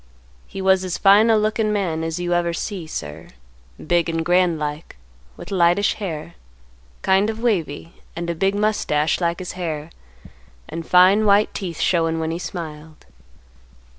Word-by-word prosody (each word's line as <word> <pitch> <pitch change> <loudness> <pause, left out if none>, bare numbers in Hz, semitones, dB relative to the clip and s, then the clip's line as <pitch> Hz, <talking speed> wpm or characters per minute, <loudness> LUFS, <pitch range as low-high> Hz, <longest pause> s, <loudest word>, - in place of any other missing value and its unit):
He 195 - -7
was 190 0 +3
as 185 -1 -3
fine 205 +3 +5
a 220 - +5
lookin' 215 0 0
man 175 -6 -1
as 165 +1 -3
you 175 0 -1
ever 170 -1 0
see, 180 -1 -5
sir; 75 - -7 0.5
big 170 0 0
and 165 0 -2
grand 175 -1 +3
like, 150 +1 -5 0.4
with - - -10
lightish 180 +2 +3
hair, 170 -5 -6 0.7
kind, 195 +2 +3
of 220 0 -4
wavy, 170 -9 -2 0.2
and 170 0 -4
a 170 - -1
big 195 +4 0
mustache 205 -8 0
like 170 0 0
his 185 - -6
hair, 160 -3 -5 0.8
and 165 0 -7
fine 190 +4 +5
white 205 +1 +4
teeth 175 -6 -5
showing 165 -2 +1
when 160 0 -2
he 165 - -4
smiled. 155 -3 -8
175 Hz, 160 wpm, -21 LUFS, 165-195 Hz, 0.8 s, fine